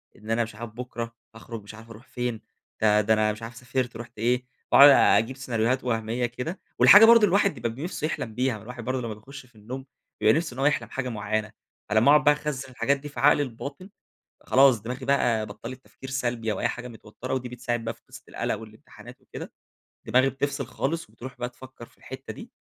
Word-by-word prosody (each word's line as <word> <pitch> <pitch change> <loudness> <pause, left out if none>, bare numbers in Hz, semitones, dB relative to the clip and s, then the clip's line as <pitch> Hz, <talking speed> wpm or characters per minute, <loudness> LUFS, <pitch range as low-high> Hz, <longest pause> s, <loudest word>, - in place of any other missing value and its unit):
إن 110 +1 -8
أنا 115 +1 +2
مش 110 -2 -9
عارف 115 +1 -7
بكره 115 0 -6 0.2
هاخرج 115 -1 -9
مش 100 +1 -11
عارف 115 +1 -14
أروح 115 +3 -13
فين، 120 -3 -3 0.4
ده 105 -1 +4
ده 110 +1 +2
أنا 110 0 +2
مش 105 +2 -9
عارف 115 +1 -7
سافرت 125 0 -3
رُحت 120 -1 -10
إيه، 125 +2 +1 0.3
باقعد 140 +1 +10
أجيب 130 -2 +4
سيناريوهات 125 0 0
وهمية 115 0 -1
كده، 125 - -5 0.2
والحاجة 205 +2 +10
برضو 230 +1 +9
اللي 210 - +4
الواحد 200 +1 +3
بيبقى 115 -4 -3
ب 115 - -9
نِفسه 160 -1 -3
يحلم 110 -8 -5
بيها 125 -1 0
ما - - -13
الواحد 120 0 -8
برضو 130 +1 -2
لما 115 -2 -4
بيخش 130 +5 -12
في 120 - -26
النوم 125 +5 -8 0.4
بيبقى 110 - +5
نِفسه 165 -6 -3
إن 130 - -9
هو 135 - +1
يحلم 120 -7 +1
حاجة 130 0 -3
معينة، 110 -1 -2 0.4
على 110 +1 +4
ما 130 - +5
أقعد 150 - +6
بقى 150 - +6
أخزن 135 -3 -5
الحاجات 140 +2 +1
دي 145 +2 -9
في 125 - -9
عقلي 145 +2 +5
الباطن، 140 - -8 0.6
خلاص 130 -3 +5
دماغي 125 +3 -6
بقى 120 -6 +2
بطلت 120 +5 -9
تفكير 130 0 -11
سلبي 120 -4 -1
أو - - -4
أي 120 - +1
حاجة 125 +1 -6
متوترة 120 +2 -7
ودي 125 -1 -3
بتساعد 120 -1 -3
بقى - - -3
في - - -28
قصة - - -12
القلق - - -2
والامتحانات 110 +3 -13
وكده، 130 - -9 0.5
دماغي 130 +2 +3
بتفصل 140 +1 -3
خالص 165 -2 -3
وبتروح 125 +3 -10
بقى 125 0 -3
تفكر 125 -1 -13
في - - -27
الحتة - - -9
دي. - - -11
125 Hz, 220 wpm, -26 LUFS, 115-135 Hz, 0.6 s, باقعد